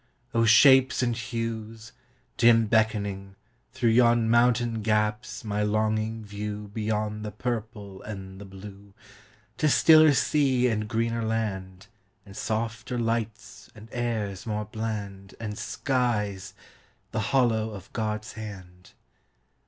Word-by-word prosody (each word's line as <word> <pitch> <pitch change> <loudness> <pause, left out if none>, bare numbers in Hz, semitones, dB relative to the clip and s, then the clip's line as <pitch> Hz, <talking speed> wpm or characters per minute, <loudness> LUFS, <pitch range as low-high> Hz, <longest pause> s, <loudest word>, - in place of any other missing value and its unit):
O 115 0 +3
shapes 130 +3 +6
and 120 -1 0
hues, 115 -1 -5 0.4
dim 115 -1 +5
beckoning, 100 -3 0 0.4
throughYon 120 -2 +3
mountain 120 -1 +2
gaps, 105 +1 -1
my 105 -1 -2
longing 110 +1 -1
viewBeyond 105 +1 -4
the 105 - -4
purple 105 -3 -5
and 95 -2 -8
the - - -8
blue, 100 +1 -12 0.6
To 155 - +3
stiller 155 0 +6
sea 135 -5 +2
and 105 -3 -1
greener 115 +1 -1
land, 100 -4 -3 0.4
And 100 -1 -13
softer 115 +3 -3
lights 115 -1 -3
and 110 +1 -13
airs 115 -4 -3
more 105 -1 -2
bland, 105 -3 -6
And 105 -2 -5
skies,—the 105 -7 -2 0.6
hollow 110 -1 +1
of 95 -3 -11
God's 105 -1 -3
hand! 95 -5 -10
110 Hz, 110 wpm, -26 LUFS, 105-115 Hz, 0.6 s, shapes